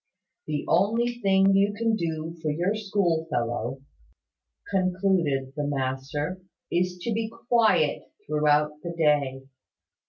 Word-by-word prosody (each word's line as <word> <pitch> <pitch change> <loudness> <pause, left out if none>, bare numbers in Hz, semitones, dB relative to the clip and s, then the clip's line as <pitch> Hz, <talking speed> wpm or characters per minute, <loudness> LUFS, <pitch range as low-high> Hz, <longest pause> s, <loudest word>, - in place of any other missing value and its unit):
"The 150 -1 -2
only 230 +7 +2
thing 195 -1 +4
you 200 +1 +3
can 230 +2 0
now 220 - +3
do 165 -2 -4
for 155 - -1
your 175 +7 0
school 195 -6 0
fellow," 120 +1 -2 0.9
concluded 185 -8 +1
the 150 -1 -2
master, 145 +5 -3 0.3
"is 180 +1 0
to 230 - -1
be 220 0 -1 0.2
quiet 235 -3 +2
throughout 150 0 +1
the 170 +1 -5
day. 145 -4 +2
170 Hz, 125 wpm, -26 LUFS, 145-195 Hz, 0.9 s, thing